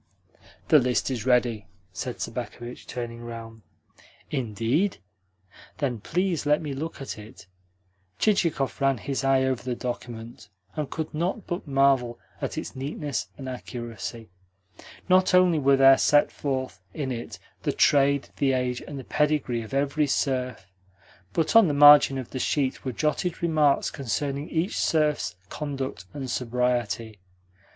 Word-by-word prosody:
"The 155 - +8
list 125 +1 0
is 125 -1 -3
ready," 120 -4 +2 0.3
said - - -5
Sobakevitch, 120 0 -6
turning 120 -1 -5
round. 115 -1 -8 0.7
"Indeed? 130 - 0 0.8
Then 130 -6 -1
please 175 - -1
let 150 +1 +3
me 150 -3 -4
look 155 +5 -5
at 135 -5 -6
it." 105 0 -13 0.7
Chichikov 165 -10 +1
ran 135 -1 +3
his 135 +5 -3
eye 135 -1 +3
over 130 -2 0
the 125 -1 -3
document, 120 -3 -6 0.3
and 150 -3 -3
could 160 -1 -4
not 175 +7 -2
but 175 -2 -4
marvel 135 -4 +2 0.2
at - - -3
its - - -5
neatness 135 -5 -3
and 130 - -7
accuracy. 120 -3 -7 0.8
Not 185 0 +4
only 180 -3 +5
were 140 -1 +4
there 135 0 +7
set 145 0 +4
forth 130 -8 -3
in 140 -4 -2
it 115 -3 -6 0.2
the - - 0
trade, 140 -1 +3
the 135 -2 +2
age, 125 -1 -1
and 145 - -8
the 135 - -6
pedigree 150 -5 0
of 110 - -9
every 140 +2 +1
serf, 130 -6 -1 0.7
but 165 - 0
on 225 -4 +8
the 145 - 0
margin 145 -1 +8
of 130 -3 -6
the 130 - -4
sheet 135 0 0
were 130 - -2
jotted 160 +6 -1
remarks 155 -4 +3
concerning 140 +3 -3
each 165 +4 -1
serf's 150 - +1
conduct 135 -9 -4
and 135 -3 -5
sobriety. 120 -3 -1
135 Hz, 145 wpm, -26 LUFS, 120-150 Hz, 0.8 s, The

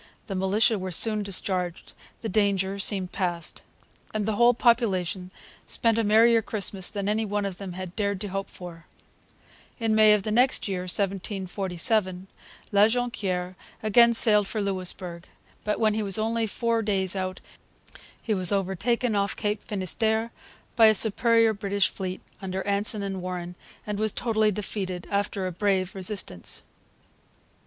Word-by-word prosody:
The 195 - -5
militia 200 +4 +2
were 185 0 -4
soon 215 +4 +2
discharged. 185 -3 -3 0.3
The 225 - -3
danger 200 -1 0
seemed 190 -2 +1
past. 175 -4 -3 0.5
And 210 -1 -1
the 215 0 -1
whole 240 +2 +5
population 195 -7 +1 0.4
spent 230 -1 +1
a - - +2
merrier 225 +2 +5
Christmas 200 -3 0
than 200 -1 -4
any 215 +2 +1
one 205 -1 -2
of 190 -2 -5
them 195 -3 -6
had 185 -1 -7
dared 200 -2 -1
to 205 - -4
hope 195 +1 -4
for. 170 -2 -11 0.9
In 225 -2 +1
May 215 -1 +6
of 210 -2 +1
the 215 - -3
next 250 +3 +3
year, 190 -2 -2
1747, 190 0 -1 0.5
La 205 +1 +5
Jonquiere 200 -7 -2 0.3
again 235 +2 +5
sailed 210 -3 +5
for 215 - -3
Louisbourg. 185 -3 -3 0.4
But 210 - -1
when 215 -2 +3
he 220 - -1
was 200 0 +2
only 225 +1 0
four 230 +2 -1
days 195 -3 +1
out 185 0 -3 0.8
he 220 - -2
was 185 -3 +1
overtaken 205 +5 0
off 200 0 0
Cape 210 -1 -2
Finisterre 220 +3 -1 0.4
by 225 -2 +7
a 215 - +5
superior 230 +2 +4
British 200 -1 0
fleet, 185 -1 -5 0.2
under 190 0 -4
Anson 205 +1 0
and 195 -2 -4
Warren, 180 -1 -5 0.3
and 210 -1 -4
was 215 0 +1
totally 220 -3 +1
defeated, 190 -3 -5
after 200 -1 -1
a 185 - -2
brave 190 0 0
resistance. 190 - -2
200 Hz, 155 wpm, -26 LUFS, 185-220 Hz, 0.9 s, by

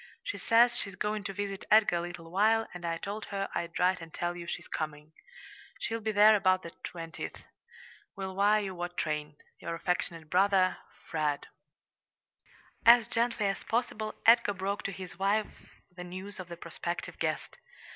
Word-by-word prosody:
She - - -4
says 235 +1 +5
she's 195 -2 -4
going 210 0 -2
to 195 - -2
visit 200 -1 -4
Edgar 215 -5 +5
a - - -1
little 170 -1 -7
while, 220 +4 +3
and 180 -1 -8
I 165 0 -1
told 205 +4 -5
her 195 -1 -3
I'd 170 -1 -3
write 180 0 +2
and 165 0 -9
tell 175 +2 -2
you 170 -1 -7
she's 175 - -5
coming. 155 -1 -5 0.7
She'll 230 0 -2
be 220 0 -1
there 210 +1 +7
about 185 -2 +3
the 170 - -7
20th. 165 -1 -7 0.7
Will 190 -1 -5
wire 205 +2 +4
you 190 -1 -4
what 175 0 -5
train. 150 -1 -2 0.2
Your 170 - -4
affectionate 165 -2 -2
brother 185 +1 +3 0.3
FRED 150 -3 0 1.4
As 235 -1 +8
gently 230 -2 0
as 195 0 -1
possible 220 -2 -1
Edgar 230 -3 +6
broke 195 +2 -2
to 195 - -1
his 185 0 -9
wife 205 +2 -1 0.2
the 180 - -7
news 185 +3 -8
of 185 - -6
the 170 -1 -8
prospective 170 +1 -5
guest. - - -2
190 Hz, 170 wpm, -30 LUFS, 170-210 Hz, 1.4 s, As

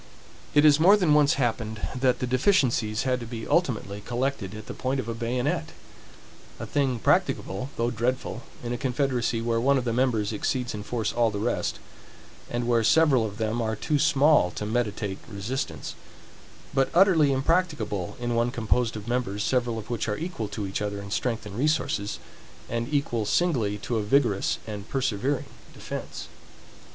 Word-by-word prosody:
It 145 - +6
has 150 -1 +6
more 195 +6 +7
than 175 -7 +3
once 150 0 +5
happened, 110 -4 -1
that 125 -1 +2
the - - -2
deficiencies 125 - +2
had 130 -1 +1
to 120 - -7
be 115 -1 -6
ultimately 110 - 0
collected 120 -4 -2
at 110 0 -8
the - - -6
point 130 +1 -2
of 130 - -2
the 115 - -3
bayonet; 120 - -2 0.9
a - - -4
thing 135 -4 0
practicable, 115 +2 0
though 115 +1 +1
dreadful, 120 +1 -2 0.2
in 120 0 -3
a 120 - -4
confederacy 125 -3 0
where 115 -1 +1
one 140 +2 +4
of 130 - -1
the 115 - 0
members 115 -4 +1
exceeds 125 +4 -1
in 105 - -5
force 110 0 -2
all 120 -1 +3
the 105 - -4
rest, 100 - -1 0.7
and 120 0 -2
where 120 -2 +3
several 140 -1 +4
of 105 -1 -9
them 110 +1 -1
are 110 -1 -1
too 150 +6 0
small 150 - +4
to 105 - -5
meditate 105 -3 -2
resistance; 110 +6 -4 0.8
but 135 -1 +2
utterly 170 -6 +5
impracticable 135 - 0
in 120 0 -1
one 115 +1 +2
composed 120 0 0
of 105 0 -7
members, 120 -4 -1
several 120 -3 0
of 110 +1 -7
which 115 -2 -2
are 105 - -1
equal 160 - -4
to 105 0 -4
each 95 +1 -3
other 100 -1 -2
in 100 0 -8
strength 115 0 -1
and 100 -1 -8
resources, 135 -6 0 0.5
and 115 +3 -3
equal 140 -6 0
singly 110 - +1
to 115 +3 -3
a - - +1
vigorous 105 -2 +2
and 105 -1 -7
persevering 130 +1 0 0.3
defense. - - -6
120 Hz, 175 wpm, -26 LUFS, 110-135 Hz, 0.9 s, more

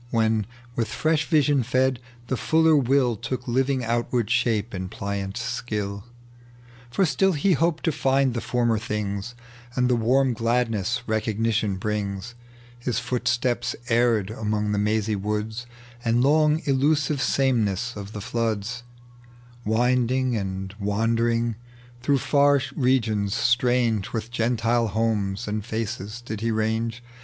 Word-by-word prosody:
When, 110 -2 +1 0.3
withfreeli 150 +7 0
riaion 140 -2 +2
fed, 130 +1 +1 0.3
the 130 - -1
fuller 160 +4 +3
will 130 -3 +3
Took 125 +3 -5
living 130 +1 +1
outward 120 -1 0
shape 115 -2 +1
in 95 -1 -4
pliant 100 0 -4
skUI; 110 -4 -3 0.9
For 190 +11 +2
still 180 +6 +2
be 175 +5 +2
hoped 165 +1 +1
to 165 - +3
find 135 -2 +2
the 120 - -2
former 120 -1 +1
things, 105 +1 -3 0.4
And 125 -1 +2
the - - +4
warm 125 +3 +2
gladnesa 115 -1 0
recognition 110 -2 0
brings. 100 +1 -3 0.5
His 120 0 -2
footsteps 120 0 0
erred 115 -4 +2
among 105 -1 -1
the 105 - +1
mazy 105 +1 +1
woods 105 +3 -3 0.4
And 115 +1 +2
long 155 +2 +3
illusive 145 +1 +2
sameness 125 -4 +1
of 100 0 -7
the 105 - -5
floods, 115 +1 -2 0.8
Winding 125 +3 +2
and 95 -2 -4
wandering. 115 +2 0 0.4
Through 140 +2 +2
far 140 +1 +3 0.2
regions, 110 -6 +1
atrange 120 -3 +1
With 115 0 -3
Gentile 115 0 +1
homes 105 -1 -1
and 105 0 -2
faces, 110 0 -4
did 110 -3 -6
be 115 - 0
range. 110 +2 -1
115 Hz, 130 wpm, -24 LUFS, 105-125 Hz, 0.9 s, the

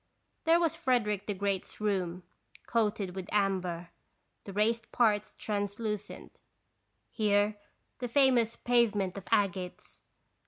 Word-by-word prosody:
There 330 +1 +5
was 330 -2 +1
Frederick 240 - 0
the 205 - -1
Great's 195 -1 -2
room, 185 -4 -1 0.4
coated 210 -5 0
with 190 0 -6
amber, 185 -4 0 0.5
the 200 - -6
raised 220 +3 0
parts 215 -3 +2
translucent; 210 0 -4 0.7
here 205 -1 +2 0.4
the 245 - -2
famous 245 -3 +3
pavement 215 -6 +2
of 195 -2 -7
agates. 195 -4 -1
210 Hz, 110 wpm, -31 LUFS, 195-230 Hz, 0.7 s, There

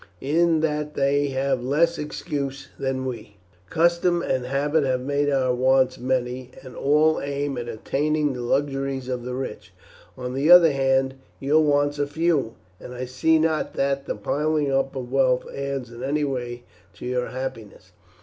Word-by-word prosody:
In 160 +3 +2
that 150 -1 -1
they 140 +1 +2
have 135 -2 -1
less 165 +6 +2
excuse 140 -2 -4
than 135 -1 -2
we. 110 -5 -7 0.3
Custom 170 +1 +2
and 125 -1 -1
habit 145 +3 +1
have 130 -2 0
made 145 +2 0
our 130 -3 +2
wants 130 +1 +2
many, 125 0 -2
and 130 -2 -11
all 150 +3 +3
aim 140 0 -2
at 120 -1 -5
attaining 150 +5 0
the 125 - -5
luxuries 135 0 -1
of 125 -1 -3
the 125 0 -4
rich. 130 0 -6 0.5
On 125 0 -5
the 140 +4 0
other 175 -3 +9
hand, 135 -1 +1 0.3
your 145 +3 +3
wants 145 0 +1
are 145 - +1
few, 150 -6 0 0.2
and 125 - -9
I 125 +1 -4
see 130 +6 +2
not 160 -1 0
that 140 0 -1
the - - -2
piling 145 +6 0
up 135 0 0
of 125 -2 -5
wealth 130 -2 +2
adds 140 -3 -4
in 120 +1 -10
any 145 +3 0
way 120 -3 -3 0.3
to - - -9
your 125 0 -1
happiness." 120 -7 -7
135 Hz, 170 wpm, -24 LUFS, 130-145 Hz, 0.5 s, other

